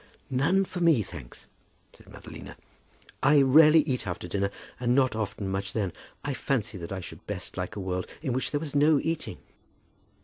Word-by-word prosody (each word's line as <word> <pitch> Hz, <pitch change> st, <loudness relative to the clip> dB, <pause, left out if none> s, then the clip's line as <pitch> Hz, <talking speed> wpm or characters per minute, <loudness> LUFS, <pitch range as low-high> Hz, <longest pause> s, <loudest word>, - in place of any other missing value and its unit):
"None 165 Hz, +10 st, +3 dB
for 180 Hz, -, -6 dB
me, 165 Hz, -10 st, +4 dB
thanks," 65 Hz, -9 st, -11 dB, 0.5 s
said -, -, -19 dB
Madalina. -, -, -10 dB, 0.7 s
"I 140 Hz, +1 st, +6 dB
rarely 155 Hz, +4 st, +7 dB
eat 130 Hz, -7 st, -2 dB
after 90 Hz, 0 st, -4 dB
dinner, 100 Hz, +2 st, 0 dB, 0.3 s
and 120 Hz, 0 st, +2 dB
not 130 Hz, -4 st, +3 dB
often 105 Hz, -2 st, -3 dB
much 95 Hz, +1 st, -3 dB
then. 100 Hz, -6 st, -1 dB, 0.3 s
I 145 Hz, -, -2 dB
fancy 115 Hz, -7 st, -2 dB
that 85 Hz, +1 st, -7 dB
I 95 Hz, -1 st, -3 dB
should -, -, -10 dB
best -, -, -6 dB
like 90 Hz, +3 st, -4 dB
a -, -, -4 dB
world 90 Hz, -1 st, -3 dB, 0.2 s
in 135 Hz, -6 st, -1 dB
which 130 Hz, -, -1 dB
there 145 Hz, -, -1 dB
was 145 Hz, -2 st, -5 dB
no 145 Hz, +1 st, +5 dB
eating." 165 Hz, +1 st, -3 dB
125 Hz, 180 wpm, -28 LUFS, 100-145 Hz, 0.7 s, rarely